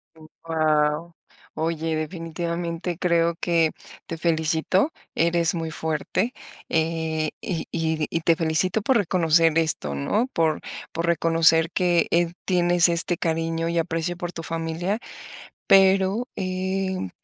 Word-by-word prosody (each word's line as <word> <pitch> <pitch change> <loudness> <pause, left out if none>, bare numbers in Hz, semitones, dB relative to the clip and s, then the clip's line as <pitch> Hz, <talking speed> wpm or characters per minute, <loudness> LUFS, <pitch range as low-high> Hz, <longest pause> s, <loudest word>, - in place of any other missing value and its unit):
Mm, 160 -1 -15 0.2
wao. 155 +1 +1 0.4
Oye, 160 0 -1
definitivamente 170 +1 -4
creo 170 -1 +2
que 165 -2 +2 0.4
te 165 - -5
felicito, 160 - +1 0.2
eres 170 0 +2
muy 165 -1 -3
fuerte, 160 - -2 0.4
eh, 160 -1 0
y 170 -4 -3
y 160 -2 -1
y 165 - -2
te 165 +1 +3
felicito 165 +6 0
por 260 +3 +3
reconocer 165 -4 +3
esto, 150 - -1
¿no? 210 - 0
Por 160 -2 +1 0.3
por 165 +1 -2
reconocer 165 -1 +4
que, 175 -2 +2
eh, 170 0 +2
tienes 175 -1 +3
este 170 +1 0
cariño 165 0 -1
y 170 - -1
aprecio 165 +1 -1
por 175 0 -4
tu 165 - -7
familia, 165 +6 -2 0.7
pero, 195 +4 +4
em, 190 - -2
165 Hz, 125 wpm, -24 LUFS, 160-175 Hz, 0.7 s, reconocer